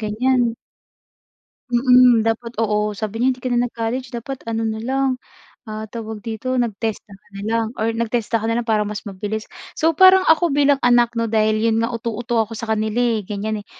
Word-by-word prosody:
ganyan. 240 +3 +1 1.2
Mm. 250 -1 +5
Dapat, 230 +1 -2
oo. 210 -1 0
Sabi 215 +1 -5
niya, 255 +2 +2
"hindi 250 - -19
ka 255 - -2
na 245 0 +2
nag-college 240 +2 -4
dapat 255 +3 -5
ano 225 0 -2
na 220 -1 -2
lang," 260 +2 -1 0.5
ah, 215 0 -5
tawag 220 -1 -8
dito, 235 +3 -3
"nag-TESDA 220 -3 -3
ka 195 - -18
na - - -6
lang 225 0 0
or 225 +1 0
nag-TESDA 230 0 -1
ka - - -3
na 230 - 0
lang 240 - -2
para 220 -2 +2
mas 210 +1 -4
mabilis." 210 +2 -5 0.3
So 325 +1 +2
parang 375 +3 +6
ako 325 +1 +4
bilang 280 0 +2
anak 240 -1 +4
'no? 230 -1 -1
Dahil 215 0 +2
'yon 225 -1 +2
nga 230 +1 0
uto-uto 230 0 -1
ako 220 +1 -5
sa 230 - -5
kanila, 215 +1 -2
eh, 235 -3 +1
gan'yan, 210 +2 -4
eh. - - -21
230 Hz, 195 wpm, -20 LUFS, 215-245 Hz, 1.2 s, parang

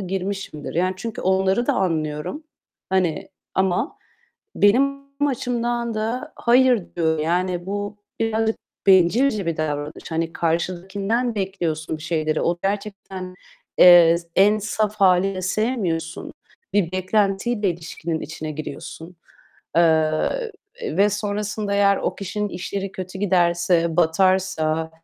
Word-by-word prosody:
girmişimdir. 190 -5 -4
Yani, 185 +2 +1
çünkü 225 +3 -5
onları 190 +5 +2
da 285 - +3
anlıyorum. 165 - -2 0.5
Hani, 185 -4 0 0.2
ama 190 +6 0 0.6
benim 275 +7 +3 0.3
açımdan 240 -2 -2
da, 225 +4 -3
hayır 245 -2 +4
diyor. 160 -2 +1
Yani 175 +2 -1
bu 205 +1 -4 0.2
birazcık 225 0 +1 0.3
bencilce 195 +4 +4
bir 165 -1 -1
davranış. 150 +1 -4
Hani, 165 +1 -2
karşındakinden 195 +8 -1
bekliyorsun 170 -6 -3
bir - - -11
şeyleri. 155 -1 -1
O 170 0 0
gerçekten, 195 -2 -4 0.4
eee, 175 -2 +8 0.2
en 210 +2 +5
saf 215 0 -1
hâliyle 190 -1 +3
sevmiyorsun. 185 -6 -2 0.4
Bir 185 -4 +1
beklentiyle 195 +3 +1
ilişkinin 165 -1 -5
içine 155 0 -6
giriyorsun. 160 +3 -8 0.6
Eee, 160 - +2 0.3
ve 210 - +2
sonrasında 210 0 -2
eğer 200 0 +4
o - - -2
kişinin 205 +2 -3
işleri 195 +2 -5
kötü 185 0 -7
giderse, 175 -3 +2
batarsa, 165 -2 +2
190 Hz, 110 wpm, -22 LUFS, 170-210 Hz, 0.6 s, eee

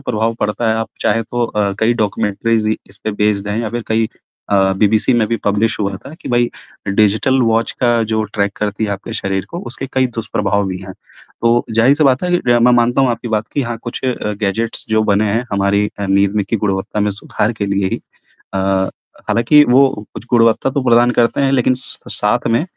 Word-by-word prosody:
प्रभाव 110 +1 0
पड़ता 105 +2 0
है, - - +2
आप 110 0 -2
चाहे 115 - +1
तो 120 +2 -2
अ, 105 -3 -1
कई 110 +2 +3
डॉक्यूमेंटरीज़ 110 0 0
इ 110 - +1
इस 95 - -11
पे 110 - 0
बेस्ड 105 -1 +1
हैं 105 +2 -1
या 110 -2 -3
फिर 120 +1 -3
कई 110 0 +1 0.4
अ, 95 -1 +3
बीबीसी 110 +4 +3
में 115 -2 +2
भी 115 - 0
पब्लिश 105 +2 +1
हुआ 100 -1 -1
था, 140 +10 -12
कि - - -7
भाई 120 -1 +2 0.4
डिजिटल 110 +6 +2
वॉच 115 0 +1
का 120 -2 +3
जो 110 0 +1
ट्रैक 100 -1 -1
करती 105 +1 -2
है 105 - -2
आपके 100 +3 -5
शरीर 95 -3 -2
को, 170 - -5
उसके 135 - -5
कई 130 -1 +2
दुष्प्रभाव 100 -2 -1
भी 95 -1 -4
हैं। 95 0 -9 0.5
तो 115 +1 +3
ज़ाहिर-सी 130 +7 +3
बात 130 -2 +3
है 180 - -1
कि - - -2
र 120 - +5
मैं 125 +1 +5
मानता 120 +2 +3
हूँ 130 -2 +3
आपकी 120 0 -4
बात 110 0 -1
कि 140 - +1
हाँ, 120 -2 -4
कुछ 120 +2 -5
अ, 125 -4 -1
गैजेट्स 110 +3 -2
जो 110 0 +2
बने 105 +2 +2
हैं, 115 +3 0
हमारी 100 +1 +2
अ, 100 - -2
नींद 100 +1 +2
में 105 - +1
की 115 - +2
गुणवत्ता 100 0 -2
में 105 0 +1
सुधार 105 +2 -2
के 100 - 0
लिए 100 -1 0
ही - - -3 0.5
अ, - - 0 0.7
हालाँकि 150 +6 +5
वो 130 +3 +6 0.3
कुछ - - -8
गुणवत्ता 115 +2 +3
तो 140 0 -1
प्रदान 120 0 +4
करते 120 +2 +1
हैं, 135 -1 +2
लेकिन 130 -1 +3
स 130 - -7 0.2
साथ 105 +4 0
में 115 +5 +2
110 Hz, 220 wpm, -17 LUFS, 100-120 Hz, 0.7 s, वो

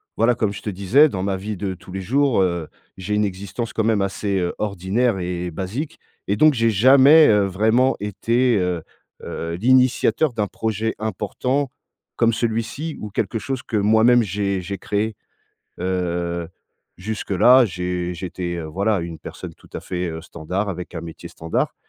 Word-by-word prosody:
voilà 115 +2 +3
comme 110 -4 -1
je 105 - -8
te - - -4
disais 100 +11 +4
dans 95 -6 -4
ma 100 -1 0
vie 105 +2 -5
de 95 0 -3
tous 90 - -13
les 95 - -4
jours, 130 +3 +2
heu, 85 -4 -1 0.3
j'ai 105 +3 -3
une 105 0 +2
existence 100 +4 -5
quand 110 - 0
même 110 -2 +2
assez, 100 0 -1
heu, 90 -1 -1
ordinaire 100 +3 0
et 90 0 -3
basique 100 - -5 0.3
et 100 +1 0
donc 155 -1 +6
j'ai 115 -2 +2
jamais, 135 +8 +7
heu, 105 -1 +4
vraiment 110 +7 +2
été, 115 +4 +1
heu, 90 -3 -1 0.4
heu, 85 0 -4
l'initiateur 125 - +3
d'un 105 -2 -1
projet 110 +1 -2
important 115 +6 -2 0.5
comme 115 - +3
celui-ci 115 +7 -2
ou 105 - -5
quelque 110 +3 -2
chose 130 +3 -4
que - - -5
moi 110 +2 +4
même 120 -1 +6
j'ai 100 -1 -1
j'ai 100 +3 -5
créé. 105 +2 -2 0.7
Heu, 85 -2 -2 0.5
jusque-là, 110 +5 +4
j'ai 90 -2 -3
j'étais, 90 0 -4
heu, 85 - -5
voilà 100 +6 0
une 85 -1 -6
personne - - -9
tout - - -21
à - - -5
fait, 90 -1 -3
heu, 80 0 -5
standard 90 +5 -4
avec 90 -2 -6
un 80 - -4
métier 80 0 -9
standard 80 0 -2
100 Hz, 175 wpm, -21 LUFS, 90-115 Hz, 0.7 s, jamais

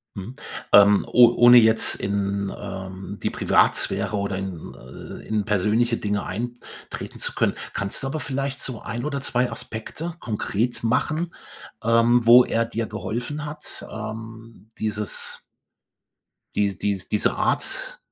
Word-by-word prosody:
Mhm. 105 +6 -7 0.4
Ähm, 100 0 +7
o 120 -1 +7
ohne 120 0 +8
jetzt 110 -1 +5
in, 100 0 -2
ähm, 95 0 -7
die - - 0
Privatsphäre 100 +1 +1
oder 100 -1 -2
in 95 -4 -6
äh, 65 - -11
in 110 -1 0
persönliche 110 +4 +2
Dinge 105 -2 -2
eintreten 120 +5 -7
zu - - -3
können, - - +1 0.2
kannst 100 +1 -2
du - - -2
aber 155 +3 -3
vielleicht 140 0 -3
so 125 -4 -4
1 120 +3 -4
oder 140 -2 -3
2 125 -2 0
Aspekte 115 +9 -6
konkret 115 +2 -2
machen, 155 +8 0 0.5
ähm, 115 +1 +3
wo 120 +2 +9
er 115 0 0
dir 115 0 -3
geholfen 120 +8 -4
hat, 150 0 -6
ähm, 110 +1 -8
dieses 105 -1 -2 1.1
die 100 -2 0
dies 100 -3 -2
diese 105 - +1
Art - - -1
110 Hz, 135 wpm, -23 LUFS, 100-120 Hz, 1.1 s, wo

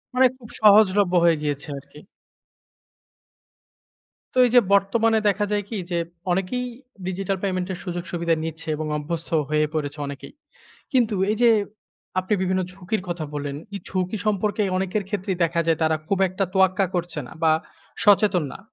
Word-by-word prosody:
মানে 260 +1 +6
খুব 235 -4 -14
সহজলভ্য 205 -3 +6
হয়ে 170 -1 +5
গিয়েছে 145 0 -3
আর 135 - -9
কি। 150 - -13 2.3
তো - - -6
এই - - +2
যে, - - +10
বর্তমানে 220 +3 +3
দেখা 205 +1 0
যায় 205 0 +1
কি 225 - -3
যে, 175 - +1 0.3
অনেকেই 195 +8 -1 0.4
ডিজিটাল 195 +1 -2
পেমেন্টের 185 -1 -2
সুযোগ-সুবিধা 175 -2 -1
নিচ্ছে 160 +1 -5
এবং 155 +1 -4
অভ্যস্ত 165 +2 -4 0.2
হয়ে 155 0 +2
পড়েছে 150 -2 -3
অনেকেই। 140 0 -8 0.6
কিন্তু 240 -4 +2 0.2
এই 215 - +1
যে, 235 - +7 0.7
আপনি 185 +3 -4
বিভিন্ন 185 0 +1
ঝুঁকির 195 +2 -3
কথা 170 -2 -3
বললেন, 145 -1 -3 0.2
এই 200 - -4
ঝুঁকি 185 +2 -2
সম্পর্কে 210 0 +1
অনেকের 190 +2 -1
ক্ষেত্রেই 190 -3 -3
দেখা 170 0 0
যায় 165 -1 +2
তারা 160 0 +3
খুব 195 +3 0
একটা 185 +2 -1
তোয়াক্কা 190 0 +3
করছে 175 -1 -2
না - - -12
বা 160 -1 +5 0.5
সচেতন 200 -4 +4
না। - - -9
185 Hz, 155 wpm, -23 LUFS, 165-205 Hz, 2.3 s, যে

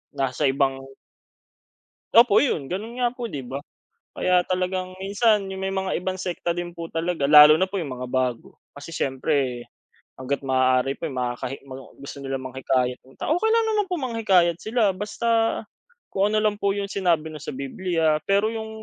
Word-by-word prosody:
nasa 135 +2 0
ibang 135 0 +1 1.4
Opo 230 -3 +7
'yon, 190 - 0
ganon 210 +6 -4
nga 245 -1 +2
po, 245 -1 -6
'di 145 -11 -6
ba? 130 +2 -5 0.6
Kaya 180 -1 +3
talagang 185 0 -2
minsan 205 +1 +2
yung 190 0 -6
may - - -1
mga 190 0 -1
ibang 185 +1 -3
sekta 175 -2 -3
din 175 0 -4
po 170 -1 -6
talaga 165 -3 -1
lalo 150 0 +10
na 190 - +2
po 200 - -2
yung 145 - -6
mga 125 0 -6
bago. 125 -2 -2 0.2
Kasi 145 +3 -10
siyempre 130 -3 -1 0.5
hangga't 135 +2 -3
maaari 130 0 +2
po 165 - -3
yung 140 - -7
makakahi 125 +2 -3
mga 135 0 -9 0.2
gusto 140 - -8
nilang 135 -1 -4
manghikayat 130 -1 -1
ng 130 +1 -20
tao. 310 - +1
Okey 445 - +1
lang 455 0 +3
naman 420 -1 +1
po - - +1
manghikayat 195 - +2
sila, 220 -2 +1
basta 210 +4 -4 0.8
kung 200 +1 +1
ano 215 - +2
lang 210 -1 +2
po 200 -1 +1
yung 200 -1 -2
sinabi 170 -5 0
'no, 155 - -8
sa 150 - -6
Bibliya. 160 +3 0
Pero 200 +2 +3
yung 220 -1 -5
170 Hz, 180 wpm, -24 LUFS, 135-200 Hz, 1.4 s, lalo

